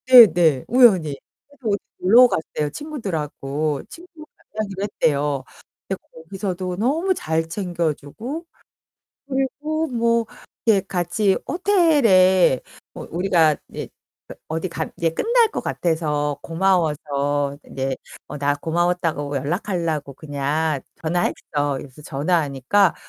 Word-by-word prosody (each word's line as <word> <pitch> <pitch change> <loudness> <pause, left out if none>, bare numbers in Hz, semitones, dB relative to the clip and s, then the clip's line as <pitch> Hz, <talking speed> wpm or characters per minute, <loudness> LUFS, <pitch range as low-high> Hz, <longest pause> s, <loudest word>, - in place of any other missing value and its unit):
네네 175 - +7
우연히. 195 - +5 0.3
그래서 275 -4 -9
어디 200 - +2 0.2
놀러 235 +7 +7
갔대요 155 -7 -2
친구들하고. 155 - -3
친구를 335 -2 -13 0.3
만나기로 200 -2 -3
했대요. 145 -8 0 0.4
근데 190 - -3
거기서도 185 +2 -4
너무 310 - +1
잘 160 - -1
챙겨 170 -3 -1
주고 235 - -7 0.8
그리고 295 +4 -1
뭐 235 -2 +1 0.4
예 215 -4 +5
같이 190 +2 0
호텔에 245 - +4 0.4
뭐 - - -8
우리가 170 -3 +3
이제 - - -6 0.6
어디 165 +3 -3
가 - - -4
이제 165 -1 +1
끝날 465 - +3
것 - - -3
같아서 150 -4 -1
고마워서 145 -5 0
이제 135 0 -2 0.3
어 - - -6
"나 145 0 +1
고마웠다고 165 -2 -1
연락하려고 160 - -2
그냥 145 +1 -1 0.2
전화했어." 150 -4 -1
그래서 135 +1 -10
전화하니까 150 +4 +1
175 Hz, 265 characters per minute, -22 LUFS, 150-215 Hz, 0.8 s, 네네